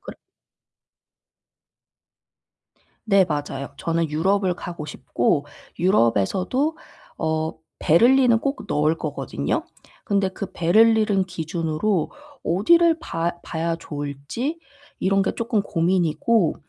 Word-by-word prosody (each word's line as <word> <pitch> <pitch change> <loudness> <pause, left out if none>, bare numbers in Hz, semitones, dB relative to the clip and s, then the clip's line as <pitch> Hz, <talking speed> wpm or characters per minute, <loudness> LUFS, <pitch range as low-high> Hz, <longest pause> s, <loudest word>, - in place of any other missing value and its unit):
그렇 - - -9 2.9
네 195 -2 +5
맞아요. 145 -2 -3
저는 165 -1 -1
유럽을 185 +4 +1
가고 170 -3 -7
싶고 140 +2 -1 0.3
유럽에서도 190 - +1 0.4
어 160 0 -1 0.3
베를린은 240 +7 +5
꼭 275 +3 -3
넣을 155 0 +2
거거든요. 135 - -3 0.4
근데 200 -2 +1
그 200 0 -6
베를린은 215 +2 +3
기준으로 165 +1 -2 0.3
어디를 330 - +4
봐 170 - -2
봐야 165 0 -2
좋을지 145 - -5 0.4
이런 195 +1 +2
게 - - 0
쪼끔 230 -2 0
고민이고 175 +2 +1
175 Hz, 220 characters per minute, -23 LUFS, 155-215 Hz, 2.9 s, 네